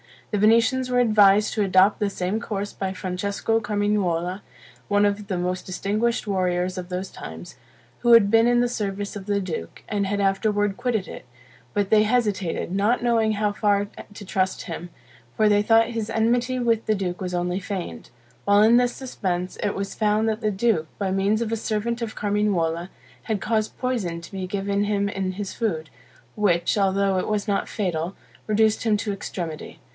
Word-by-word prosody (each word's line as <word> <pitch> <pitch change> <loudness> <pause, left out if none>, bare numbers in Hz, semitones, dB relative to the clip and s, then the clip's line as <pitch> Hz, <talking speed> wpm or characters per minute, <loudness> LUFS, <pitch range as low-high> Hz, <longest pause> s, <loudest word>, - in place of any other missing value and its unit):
The 210 - 0
Venetians 230 +4 +3
were 250 0 +2
advised 210 -2 +5
to 215 - 0
adopt 195 +1 +4
the 205 -2 +1
same 190 +2 -2
course 205 -3 -4
by 190 -1 -4
Francesco 200 +4 -1
Carmignuola, 205 -4 0 0.5
one 205 0 +3
of 205 0 -1
the 190 - -2
most 180 +1 -2
distinguished 210 +6 -1
warriors 185 -2 0
of 180 -1 -5
those 185 +1 -4
times, 80 +8 -9 0.4
who 240 -1 +4
had 205 -3 +7
been 225 +1 +5
in 240 0 +4
the 245 - +1
service 205 -3 -3
of 195 - -9
the 200 -1 0
duke, 160 - -6
and 200 -2 0
had 200 +1 -1
afterward 205 +1 +1
quitted 240 -6 -1
it; - - -9 0.5
but 205 -1 0
they 215 -1 +5
hesitated, 210 -8 0
not 205 +6 +1
knowing 225 -2 +2
how 210 0 0
far 205 -1 +1 0.2
to 205 0 -10
trust 185 -1 -1
him; 175 0 -6 0.5
for 215 -1 +3
they 205 0 +4
thought 225 +1 +4
his 225 -2 -3
enmity 240 +3 +1
with 230 -2 +1
the 215 - +2
duke 180 -3 -3
was 180 -2 -4
only 180 +1 -1
feigned. 180 - -6 0.4
While 205 +1 +5
in 230 +2 +6
this 245 0 +2
suspense, 185 -8 -3
it 205 - -1
was 195 0 -4
found 215 +1 +1
that 220 +1 -2
the 215 - +1
duke, 200 -5 +1
by 195 -2 -1
means 200 +3 +1
of 225 -1 -2
a 225 - 0
servant 225 +2 -2
of 230 -2 -4
Carmignuola, 190 -5 0 0.3
had 220 -3 -2
caused 215 -1 -1
poison 220 -10 -2
to 170 - -12
be 190 -2 -4
given 200 +1 -1
him 200 -1 0
in 190 -2 -2
his 195 0 -5
food, 165 -9 -2 0.5
which, 175 -5 +2
although 195 -1 +2
it - - -3
was 210 0 -1
not 200 - 0
fatal, 180 -3 -2 0.3
reduced 215 0 +2
him 220 -2 +3
to 205 0 -3
extremity. 170 -5 -6
205 Hz, 185 wpm, -24 LUFS, 190-220 Hz, 0.5 s, had